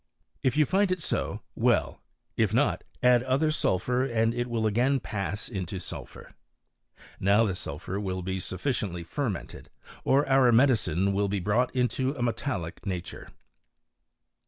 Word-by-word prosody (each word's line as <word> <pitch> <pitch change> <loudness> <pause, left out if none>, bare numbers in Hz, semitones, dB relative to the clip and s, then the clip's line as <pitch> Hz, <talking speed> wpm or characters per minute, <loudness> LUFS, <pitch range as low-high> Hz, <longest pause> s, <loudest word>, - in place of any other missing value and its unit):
If 130 +1 +1
you 155 - +5
find 190 +4 +2
it 185 - 0
so, 155 - -2
•well; - - +1 0.4
if 110 -1 +1
not 145 +4 +2 0.2
add 125 -1 +6
other 135 +5 +1
sulphur 125 -1 +1
and 115 -3 +1
it 120 +1 -2
will 115 -2 -1
again 125 +6 +2
pass 100 -2 -3
into 95 -4 -4
isulphur. 95 - -8 0.9
Now 100 +4 +4
the 100 - 0
sulphur 90 +3 -5
will 95 -2 -3
be 95 +1 -2
sufficiently 95 -2 -3
ferment 110 - -3
led, - - -12 0.3
or 140 +2 +3
our 135 -2 +5
medicine 110 - +3
will 100 +1 +1
be 100 0 -1
brought 105 +7 +1
into 130 +2 0
a 125 - -3
metallic 110 - -3
jas^ure. 90 -3 -5
115 Hz, 150 wpm, -28 LUFS, 95-130 Hz, 0.9 s, add